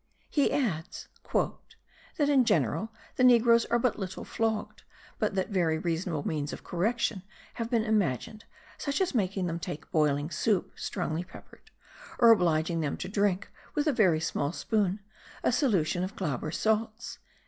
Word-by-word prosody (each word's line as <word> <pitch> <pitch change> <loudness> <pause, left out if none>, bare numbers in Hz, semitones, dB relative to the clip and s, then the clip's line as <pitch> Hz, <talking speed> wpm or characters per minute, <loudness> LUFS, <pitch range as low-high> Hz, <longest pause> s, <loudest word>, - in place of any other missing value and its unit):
He 285 - +2
adds 180 - -2 0.2
"that 290 - -3
in 280 -3 +5
general 170 - +1 0.3
the 255 - +3
negroes 235 -2 +6
are 235 - +2
but 240 -2 0
little 190 -2 -5
flogged, 220 -2 -2 0.4
but - - 0
that 190 - 0
very 170 -6 +1
reasonable 165 -2 -2
means 150 -2 -2
of - - -8
correction 215 +3 -1 0.4
have 230 - -2
been 230 -2 +2
imagined, 215 - -1 0.3
such 280 -1 -1
as 375 -4 +1
making 195 -5 0
them 170 -1 -2
take 170 -3 -7
boiling 150 -2 +1
soup 195 +4 0
strongly 160 +2 -3
peppered, 180 - -15 0.5
or 235 -2 +7
obliging 165 -5 +2
them 150 -3 -1
to - - -5
drink, 200 0 0 0.2
with 295 - +1
a 300 - +2
very 185 -9 +4
small 150 -2 -1
spoon, 200 +1 0 0.4
a - - +3
solution 195 - +1
of 185 - -5
Glauber 155 -5 -2
salts." 220 +5 -1
195 Hz, 155 wpm, -29 LUFS, 165-230 Hz, 0.5 s, or